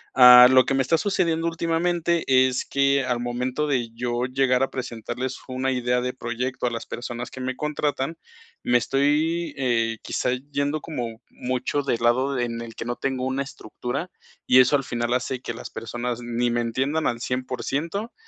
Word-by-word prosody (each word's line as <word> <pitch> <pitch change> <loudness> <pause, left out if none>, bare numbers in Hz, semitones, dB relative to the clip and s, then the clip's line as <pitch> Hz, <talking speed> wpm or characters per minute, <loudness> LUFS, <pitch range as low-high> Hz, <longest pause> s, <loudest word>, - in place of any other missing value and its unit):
Ah, 125 -1 +10
lo 130 0 +6
que - - 0
me 135 - +2
está 165 +6 +2
sucediendo 170 -4 0
últimamente 170 0 0
es 130 -1 +3
que 140 0 +2
al 125 -2 -1
momento 125 +4 -2
de 125 -5 0
yo 120 +1 -2
llegar 130 0 +1
a 135 - 0
presentarles 125 +1 -5
una 130 +1 -1
idea 125 -1 +1
de 125 0 -2
proyecto 125 +1 -3
a - - -1
las 115 - -5
personas 120 0 -6
que 130 - -8
me 130 0 -3
contratan, 150 0 -2 0.5
me 120 - +4
estoy, 150 +6 +1
eh, 115 -4 0
quizá - - -1 0.2
yendo 140 +2 0
como 120 -7 -5
mucho 130 +3 -2
del 130 -4 -1
lado 130 +3 +2
en 115 -1 -2
el 115 -1 -9
que - - -6
no 120 +1 -2
tengo 130 -1 -2
una 130 +1 -1
estructura, 135 +5 -5 0.3
y 130 - +6
eso 130 +3 +5
al 140 - +1
final 120 -1 -2
hace 125 0 -2
que 115 - -5
las - - -8
personas 120 +2 -4
ni 120 0 -1
me 120 0 +1
entiendan 135 +7 0
al 120 - -1
100%. 135 - -3
130 Hz, 180 wpm, -24 LUFS, 120-140 Hz, 0.5 s, Ah